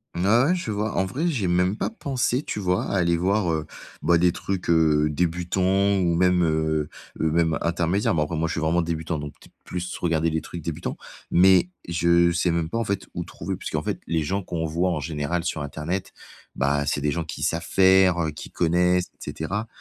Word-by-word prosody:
Mmh, 85 +2 -1
ouais 115 +4 +5
ouais, 180 - +3
je 175 -10 -4
vois. 105 +1 -2
En 95 - +2
vrai, 140 - -2
j'y 130 - -1
ai - - +1
même 90 +3 +2
pas - - -2
pensé, 135 - -1
tu 105 - -4
vois? 90 -2 0
À 100 - -1
aller 85 -2 +2
voir, 95 +1 +1
heu, 80 -1 -1 0.4
bah, 85 +2 +4
des 90 +1 +4
trucs, 95 +1 -4
heu, 75 -2 +4
débutants 90 +5 +1
ou 90 -3 +2
même, 90 +1 +3
heu 80 -1 0 0.3
heu 80 -1 +1
même 80 0 +2
intermédiaire, 85 +4 +1
mais 80 - +1
après 80 +2 -2
moi, 80 +1 0
je 80 - -3
suis 80 - -2
vraiment 85 +2 +2
débutant, 80 -1 -3
donc 75 0 -8
t - - -17
plus 90 0 -5
regarder 85 -1 +1
les 80 0 -1
trucs 85 - -8
débutants. 80 +1 -4 0.3
Mais 90 0 +5 0.2
je 85 0 +3
sais 85 +1 +1
même 85 -1 -1
pas 115 - -3
en 115 - +1
fait, 100 -2 -3
où - - -2
trouver, - - -5
puisqu'en - - -3
fait - - -3
les 80 -1 0
gens 95 +6 -2
qu'on 85 -2 -3
voit 85 +4 0
en 85 - -1
général 75 +3 -2
sur 80 -3 -2
internet, 75 +6 -4 0.4
bah, 70 +1 +1
c'est 70 - -1
des 75 +1 +1
gens 85 +2 -2
qui 80 - -8
savent 85 0 -1
faire, 95 -2 +5
heu, 80 - 0
qui 75 - -10
connaissent, 90 +1 +2 0.2
et - - -4
cetera. 100 +8 -3
85 Hz, 225 wpm, -24 LUFS, 80-95 Hz, 0.4 s, ouais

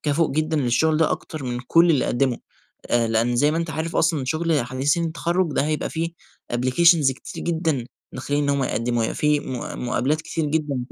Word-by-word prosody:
كفء 155 +2 +1
جدًا 155 +2 0
للشغل 150 +4 +2
ده 160 0 +2
أكتر 155 -4 -4
من 120 -1 -3
كل 165 +7 +4
اللي 145 -5 +2
قدموا، 125 -1 +1 0.5
آآ 120 -1 +2
لأن 115 +2 +1
زي 145 +5 +3
ما 155 - -1
أنت 170 -1 -2
عارف 160 +1 -3
أصلًا 160 -4 +1
شغل 160 +1 0
حديثين 135 +7 0
التخرج 170 +2 0
ده 140 - +1
هيبقى 155 0 -2
فيه 165 +1 -2 0.4
Applications 135 +4 +4
كتير 130 - -9
جدًا 160 -7 -1 0.3
داخلين 145 +2 -2
إن - - -1
هُم 140 -1 +1
يقدموا، 120 -1 -1
هيبقى 110 - -2
فيه 150 -1 +2
مـُ 125 -1 -5
مُقابلات 135 +5 0
كتير 160 0 -3
جدًا. 145 -2 -1
145 Hz, 190 wpm, -23 LUFS, 130-160 Hz, 0.5 s, كل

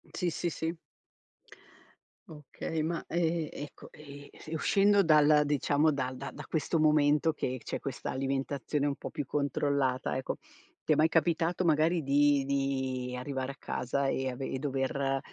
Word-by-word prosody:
Sì, 180 - 0
sì, 170 +1 -2
sì. 160 +2 -3 1.5
Okay, 155 0 -5
ma, 165 +2 -2
ehm, 165 -2 0
ecco, 145 - -9
ehm, 145 -1 -12 0.2
e 160 - -4
uscendo 200 +4 +4
dalla 150 -2 +5
diciamo, 145 +1 +2
dal 130 -2 -3
da 135 +2 -6
da - - -9
questo 160 +1 -1
momento 150 +1 +4
che 130 -3 -3
c'è - - -3
questa 140 -1 -5
alimentazione 135 +2 -1
un 140 - -1
po' - - -7
più 145 -3 -4
controllata 140 -3 0
ecco, 130 - -3 0.5
ti 155 - +3
è - - +2
mai 155 +2 +4
capitato 165 +2 +1
magari 160 +2 +3
di 145 0 +3
di 130 -2 -1
arrivare 130 +1 -3
a 140 - -12
casa 135 +3 -1
e 130 -1 -1
ave 130 +2 -5
e - - -2
dover, 135 0 -1
145 Hz, 155 wpm, -30 LUFS, 135-160 Hz, 1.5 s, dalla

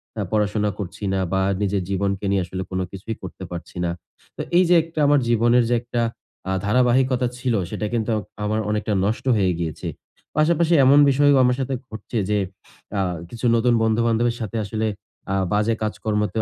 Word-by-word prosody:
অ্যা 105 - -2
পড়াশোনা 105 0 +1
করছি 100 +1 -6
না 95 - +1
বা 95 - +2 0.2
নিজের 100 -2 0
জীবনকে 100 +1 -1
নিয়ে 95 -2 +2
আসলে 95 +1 -5
কোন 95 - -1
কিছুই 100 +3 -6
করতে 95 +1 -8
পারছি 90 +1 -8
না। 85 - 0 0.5
তো - - -3 0.2
এই 185 - +6
যে 180 - +6
একটা, 165 -1 -7
আমার 145 0 +5
জীবনের 120 +1 +4
যে 120 - +3
একটা 120 0 -2 0.5
আ - - 0
ধারাবাহিকতা 125 +2 +3
ছিল 125 -1 -1 0.2
সেটা 105 - -3
কিন্তু 115 0 0 0.3
আমার 110 +1 0
অনেকটা 105 0 -1
নষ্ট 110 +5 -2
হয়ে 95 -2 +2
গিয়েছে। 80 -3 -4 0.5
পাশাপাশি 170 +2 +3
এমন 140 +2 +7
বিষয়ও 145 0 +4
আমার 125 0 +3
সাথে 135 0 -2
ঘটছে 110 +1 -6
যে 105 - +2 0.6
আ - - +2 0.3
কিছু 120 +1 -6
নতুন 120 +1 +3
বন্ধু-বান্ধবের 115 +1 +2
সাথে 110 +1 -4
আসলে 110 +2 -2 0.5
আ - - +1 0.2
বাজে 105 +2 +2
কাজকর্মতেও 105 0 -1
110 Hz, 175 wpm, -22 LUFS, 105-125 Hz, 0.6 s, এমন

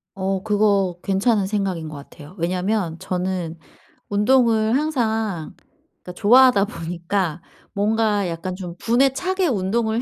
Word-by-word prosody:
어 190 0 -2
그거 200 -4 +1
괜찮은 200 +1 +1
생각인 190 -5 -2
것 155 - -8
같아요. 145 +3 -13
왜냐면 180 0 -1
저는 180 -2 -3 0.5
운동을 225 +1 +3
항상 225 - -2 0.5
그러니까 180 - -8
좋아하다 230 0 +5
보니까 170 -2 -3 0.3
뭔가 210 -1 +1
약간 170 +2 -4
좀 180 -2 -7
분에 250 +6 +2
차게 370 +4 -1
운동을 220 - 0
200 Hz, 275 characters per minute, -21 LUFS, 180-225 Hz, 0.5 s, 좋아하다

